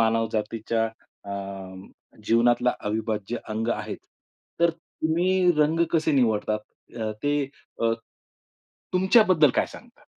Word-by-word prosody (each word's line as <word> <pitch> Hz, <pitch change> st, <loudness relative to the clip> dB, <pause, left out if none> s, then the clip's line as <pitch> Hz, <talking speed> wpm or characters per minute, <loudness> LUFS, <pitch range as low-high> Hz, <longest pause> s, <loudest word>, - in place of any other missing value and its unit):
मानवजातीच्या 115 Hz, 0 st, 0 dB, 0.5 s
अ, -, -, -2 dB, 0.9 s
जीवनातला 120 Hz, +2 st, +3 dB, 0.2 s
अविभाज्य 110 Hz, +1 st, -2 dB
अंग 110 Hz, +1 st, -2 dB
आहेच. -, -, -5 dB, 0.6 s
तर 170 Hz, 0 st, +5 dB
तुम्ही 175 Hz, +2 st, +1 dB
रंग 155 Hz, +3 st, +3 dB
कसे 160 Hz, -1 st, +2 dB
निवडतात, 110 Hz, -5 st, +2 dB, 0.4 s
अ, 110 Hz, -2 st, -2 dB
ते 145 Hz, 0 st, +2 dB, 0.5 s
अ 115 Hz, -, +3 dB, 1.0 s
तुमच्याबद्दल 185 Hz, -, +5 dB
काय -, -, +2 dB
सांगतात? -, -, -15 dB
120 Hz, 100 wpm, -25 LUFS, 110-165 Hz, 1.0 s, तर